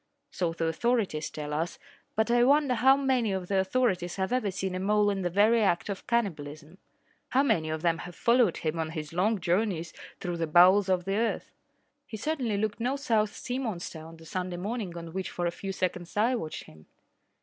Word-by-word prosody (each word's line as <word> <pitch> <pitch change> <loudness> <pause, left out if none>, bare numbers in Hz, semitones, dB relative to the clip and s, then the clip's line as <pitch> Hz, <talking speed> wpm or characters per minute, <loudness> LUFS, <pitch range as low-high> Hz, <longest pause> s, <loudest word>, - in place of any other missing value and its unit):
So 175 -3 -1
the 165 0 -2
authorities 185 -2 0
tell 150 -1 -6
us, 160 +3 -2 0.4
but 220 +2 +1
I 240 0 +5
wonder 280 0 +4
how 265 +3 +5
many 260 -6 +1
of 185 -2 -4
the 195 -1 +2
authorities 190 -4 0
have 190 +4 -1
even 250 -6 0
seen 190 0 -3
a 185 - -2
mole 205 +1 +2
in 195 -1 -2
the 180 - 0
very 215 +5 +4
act 190 -2 +1
of 195 -2 -5
cannibalism. 160 -7 -2 0.5
How 270 +2 +3
many 160 - +1
of 155 +1 -3
them 170 -1 +2
have 175 -1 -8
followed 235 -6 +3
him 160 +1 -2
on 160 -1 -1
his 155 0 -6
long 200 +5 +1
journeys 175 -2 0 0.3
through 175 -2 -3
the 165 -1 -1
bowels 185 +5 +6
of 180 -2 +1
the 195 +1 0
earth? 230 +1 -1 0.6
He 220 - -6
certainly 245 -4 -1
looked 215 +1 -1
no 250 +4 0
South 220 -6 0
Sea 250 +1 -4
monster 185 -9 -4
on 165 +1 -11
the 165 - -15
Sunday 180 +2 -4
morning 200 -2 -4
on 165 -1 -8
which 190 0 -3
for 175 - -3
a 170 - +1
few 195 +3 -5
seconds 180 -1 -3
I 230 +5 +3
watched 160 -11 -4
him. 80 0 -17
190 Hz, 210 wpm, -28 LUFS, 170-230 Hz, 0.6 s, bowels